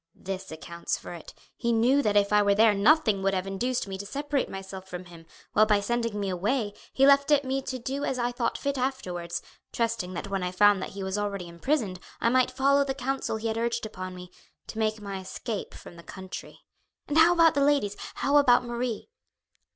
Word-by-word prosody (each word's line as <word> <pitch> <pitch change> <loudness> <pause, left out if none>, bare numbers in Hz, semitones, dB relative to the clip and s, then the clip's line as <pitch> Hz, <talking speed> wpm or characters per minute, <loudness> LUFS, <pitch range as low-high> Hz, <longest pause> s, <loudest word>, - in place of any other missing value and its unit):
This 190 -2 -6
accounts 170 +2 -4
for - - -9
it. 170 - -10 0.2
He 235 -1 -1
knew 245 +5 +4
that 210 -5 +2
if 205 0 +3
I 210 - +6
were 200 -1 +3
there 220 0 +5
nothing 215 -1 +4
would 195 0 +1
have 185 0 -1
induced 230 +5 -2
me 190 -1 -5
to 200 - -5
separate 285 +3 -2
myself 190 0 -8
from 180 0 -7
him, 170 -2 -14 0.3
while 215 +1 +5
by 210 -1 +4
sending 230 0 -1
me 200 - -2
away 205 +4 -1 0.2
he 270 - +4
left 280 0 +5
it 290 -1 +4
to - - -8
me 270 +1 0
to 260 -1 -4
do 270 +3 -4
as 265 - -1
I 240 0 0
thought 240 -1 -1
fit 280 -1 -2
afterwards, 185 -10 -3 0.3
trusting 230 -6 -2
that 170 - -4
when 195 -1 -2
I 180 - -1
found 205 +1 +4
that - - -6
he 195 - -4
was 190 +2 -2
already 200 -3 -3
imprisoned 185 - -1 0.2
I 230 - +2
might 255 +1 +3
follow 275 +2 +3
the 270 -1 -3
counsel 270 -3 -2
he 225 +1 -3
had 225 0 -1
urged 235 0 -1
upon 185 -3 -7
me, 180 0 -10 0.3
to 220 - -7
make 215 0 0
my 200 -2 -5
escape 200 +3 -5
from 170 - -12
the - - -10
country. 190 +2 -9 0.5
And 295 +2 +2
how 330 +2 +7
about 330 -2 +5
the 285 - +1
ladies, 280 -9 +2 0.2
how 285 +1 +2
about 250 -3 +5
Marie?" 240 -1 -3
215 Hz, 220 wpm, -27 LUFS, 190-260 Hz, 0.5 s, how